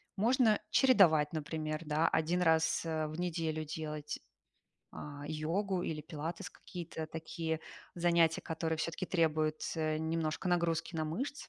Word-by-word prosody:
Можно 225 +1 +4
чередовать, 180 - +5
например, 155 0 -3
да. 155 +2 +2
1 170 +3 +1
раз, 160 0 +3
э, 160 -1 -1
в 155 +2 -6
неделю 160 -3 -1
делать, 150 -1 -5 0.8
а, 145 -1 -7
йогу, 175 +5 -1
или 155 -3 -3
пилатес, 165 +4 -5
какие-то 170 -3 -7
такие 160 0 -3 0.4
занятия, 170 -2 +3
которые 160 0 -2
всё-таки 165 +3 -2
требуют, 155 -3 +1
э, 155 -1 0
немножко 160 +2 -1
нагрузки 170 -1 +1
на 160 -1 0
мышцы, 255 - -4
160 Hz, 130 wpm, -33 LUFS, 155-175 Hz, 0.8 s, чередовать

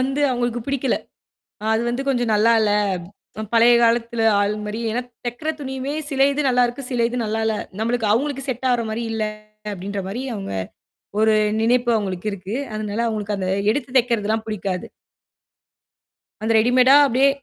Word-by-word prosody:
வந்து 270 +2 0
அவங்களுக்கு 240 -1 -1
புடிக்கல. 275 -2 0 0.8
அது 220 +1 +2
வந்து 240 +3 -2
கொஞ்சம் 245 -4 +1
நல்லால்ல. 220 0 +4 0.7
அ - - -2
பழைய 235 +1 +6
காலத்துல 235 0 +1 0.2
ஆள் 205 +1 +1
மாரி 210 +2 -4
ஏன்னா, 240 +3 -1 0.2
தைக்கிற 245 +6 -3
துணியுமே 265 0 -4 0.2
சில 270 -2 +3
இது 295 - -1
நல்லாருக்கு. 245 +1 +1
சில 240 -2 +1
இது 245 - -4
நல்லால்ல. 220 0 0 0.2
நம்மளுக்கு 230 0 0
அவங்களுக்கு 275 +3 -1
செட் 260 +1 -2
ஆகிற 240 -2 +2
மாரி 230 +2 -3
இல்ல 220 -1 -1 0.5
அப்படின்ற 200 +1 -5
மாரி 215 +6 -4
அவுங்க 195 - -5 0.7
ஒரு 220 0 +4 0.3
நினைப்பு 240 +2 +2
அவுங்களுக்கு 195 -1 -3
இருக்கு. 195 +2 -6 0.2
அதனால 215 0 -3
அவுங்களுக்கு 210 -2 -2
அந்த 185 -1 -2 0.2
எடுத்து 250 +2 -2
தைக்கறதுலாம் 225 -2 0
புடிக்காது. 195 -4 -3 1.6
அந்த 220 +1 +1
ரெடிமேடா 250 +4 +5
அப்டியே 265 +2 +3
230 Hz, 150 wpm, -21 LUFS, 215-250 Hz, 1.6 s, பழைய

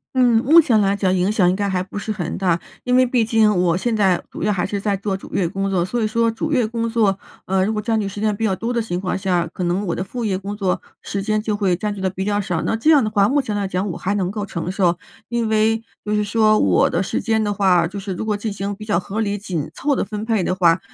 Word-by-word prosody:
嗯， 245 -3 +4
目 325 +5 +8
前 240 -8 +3
来 200 -1 +2
讲 195 -2 +1
影 185 +2 +1
响 190 -5 +3
应 180 - +1
该 200 +1 -1
还 190 -2 0
不 185 +2 -7
是 210 +1 -3
很 180 -5 -3
大。 175 -3 +1 0.2
因 250 0 +1
为 255 - +6
毕 245 -2 +1
竟 220 -1 +3
我 175 -2 +2
现 225 +5 -1
在 190 -4 +3
主 - - -7
要 210 - +2
还 180 -2 -1
是 205 +1 -2
在 200 0 0
做 195 0 -2
主 - - -13
业 175 -4 +1
工 195 +1 -2
作， 180 -3 +1
所 240 +7 -2
以 - - +2
说 230 +2 +1
主 305 +8 -3
业 245 -5 +2
工 230 +1 -2
作， 220 -4 +2 0.3
呃， 190 0 +2
如 215 - -1
果 210 - -2
占 220 +1 0
据 205 - -2
时 200 +1 -6
间 215 -1 +1
比 225 - -3
较 195 -3 +1
多 230 +5 -3
的 240 - 0
情 185 -6 -3
况 190 - -2
下， 180 -3 0
可 180 - -5
能 180 +4 -1
我 170 - -1
的 185 - -2
副 240 +5 -5
业 200 -4 0
工 200 +2 -5
作 195 -3 -1 0.2
时 200 -1 -4
间 215 +1 0
就 210 -1 -2
会 195 -4 +1
占 205 +3 -3
据 - - -8
的 190 -1 -1
比 190 +1 -4
较 205 0 0
少。 180 -5 -2
那 - - 0
这 265 +8 +3
样 290 -4 +5
的 215 - 0
话， 200 -2 +3
目 285 +5 +2
前 215 -5 -4
来 200 -1 -1
讲 190 +2 -2
我 175 - -4
还 195 - -1
能 190 -3 0
够 205 +1 -4
承 175 -2 -4
受， 180 -3 +1 0.3
因 235 -2 -1
为 220 +1 +2 0.2
就 210 - -1
是 210 0 +2
说 215 +1 +3
我 90 -3 +3
的 170 - +1
时 190 - -2
间 220 -1 0
的 205 - 0
话， 185 -4 +3
就 195 +4 -7
是 195 -1 -4
如 180 - -4
果 215 -1 -1
进 210 0 -4
行 200 0 -4
比 215 - -10
较 205 -5 +1
合 195 +4 -5
理 205 -2 0
紧 175 -7 -4
凑 285 0 0
的 - - -1
分 210 +1 -5
配 220 -4 +1
的 180 - 0
话， 175 -2 +3
205 Hz, 325 characters per minute, -20 LUFS, 190-220 Hz, 0.3 s, 目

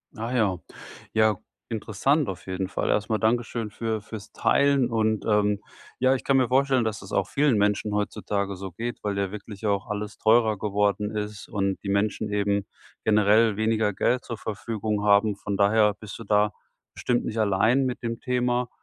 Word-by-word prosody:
Ah 115 +3 -4
ja, 100 -6 +1 0.5
ja, 110 -2 +4 0.3
interessant. 115 +6 0
Auf 95 - -7
jeden 95 0 -3
Fall - - -2
erstmal 105 +1 +1
Dankeschön 115 -1 0
für 110 0 -3
für's 105 0 -9
Teilen 140 -3 +2
und, 110 -2 0
ähm 105 -1 +2 0.4
ja, 130 +1 +4
ich - - -5
kann 135 -1 +3
mir 130 -2 +3
vorstellen, 130 -1 +3
dass 105 -2 -3
es 100 - -11
auch 100 0 +1
vielen 140 -5 +2
Menschen 105 +1 +1
heutzutage 100 -1 -2
so 95 0 -7
geht, 120 +7 -5
weil 100 -1 -2
ja 100 -1 -1
wirklich 105 0 -8
auch 100 0 0
alles 105 0 -5
teurer 110 -1 +3
geworden 105 0 0
ist 105 0 -5
und 100 -2 -1
die 100 - -4
Menschen 105 +1 0
eben 100 -1 0 0.4
generell 105 0 +4
weniger 110 -2 +1
Geld 125 +6 +1
zur 115 -3 -6
Verfügung 110 -1 -3
haben. 105 0 +4
Von 100 -1 -4
daher 105 +1 +4
bist 110 -2 -9
du - - -7
da 105 0 +2 0.4
bestimmt 120 -1 -1
nicht 115 - -4
allein 110 +6 +3
mit 125 -1 -3
dem 115 0 -3
Thema. 125 -1 0
105 Hz, 180 wpm, -25 LUFS, 100-115 Hz, 0.5 s, ja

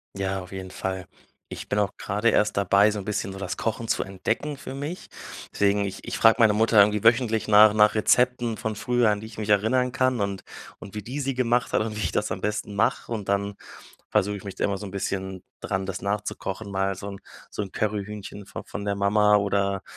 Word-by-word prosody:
Ja, 95 0 -2
auf 90 - -12
jeden 95 -1 -7
Fall. 95 -1 -4 0.4
Ich - - -8
bin 105 - +1
auch 100 -3 +1
gerade 105 +4 0
erst 105 -2 +2
dabei, 100 +2 +4
so 105 - -3
'n 95 - -7
bisschen 105 -2 -2
so 95 - -8
das 95 -2 -3
Kochen 115 0 -3
zu - - +1
entdecken 135 +9 -3
für 135 -1 -8
mich. 145 +6 -6 0.5
Deswegen 100 0 +2
ich 95 - -7
ich - - -4
frage 115 0 +6
meine 110 -2 +6
Mutter 110 +1 +2
irgendwie 105 0 +5
wöchentlich 115 -1 +3
nach 105 0 +7
nach 105 0 +4
Rezepten 120 +1 +2
von 110 -2 -3
früher, 120 +1 +2
an 105 -1 0
die 110 - -8
ich 110 - -13
mich 105 - -4
erinnern 120 +5 +2
kann 130 -2 +1
und 100 -1 -2 0.4
und 100 - -11
wie 105 - -4
die 130 +7 -4
sie 135 -1 -2
gemacht 120 -1 +1
hat - - +2
und 110 0 -3
wie 105 - -4
ich 85 - -1
das - - -1
am - - -7
besten 105 -1 -3
mache. 100 +3 0
Und 105 -4 -5
dann 100 +1 0 0.6
versuche 105 +1 +1
ich 100 - -10
mich 100 -1 -8
immer 100 -1 0
so 105 - -7
'n 95 - -9
bisschen 95 -1 -3 0.2
dran, 95 -1 -2
das 95 -2 -5
nachzukochen, 100 0 -3
mal 95 0 0
so 100 - -7
'n 100 -1 -7 0.3
so - - -4
'n 95 - -7
Curryhühnchen 105 -1 -4
von - - -7
von 100 - -6
der 100 -1 0
Mama 105 +1 +3
oder 100 -1 0
105 Hz, 230 wpm, -25 LUFS, 100-110 Hz, 0.6 s, nach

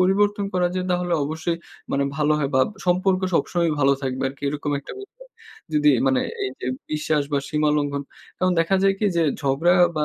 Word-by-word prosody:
পরিবর্তন 205 +2 +2
করা 180 -1 +2
যায় 185 0 -1
তাহলে 180 0 0
অবশ্যই 160 +3 -2 0.4
মানে 140 0 +1
ভালো 150 0 +2
হয় 140 -2 0
বা 130 - +5 0.3
সম্পর্ক 185 +1 +2
সবসময়ই 170 -1 +1
ভালো 140 0 +5
থাকবে 130 0 -2
আরকি 135 +1 -13
এরকম 145 0 -3
একটা - - -10
বিষয়। 400 +5 -14 0.5
যদি 150 0 +5 0.2
মানে 130 -1 +3 0.2
এইযে 130 0 -5 0.3
বিশ্বাস 150 0 +1
বা 140 - +3
সীমা 150 0 +1
লঙ্ঘন। 145 -1 -1 0.4
তখন 185 0 +2
দেখা 180 +4 +2
যায় 195 0 +4
কি 210 - +1
যে 170 - +3 0.2
ঝগড়া 145 +6 +2 0.2
বা 150 - +1
155 Hz, 185 wpm, -23 LUFS, 145-180 Hz, 0.5 s, বা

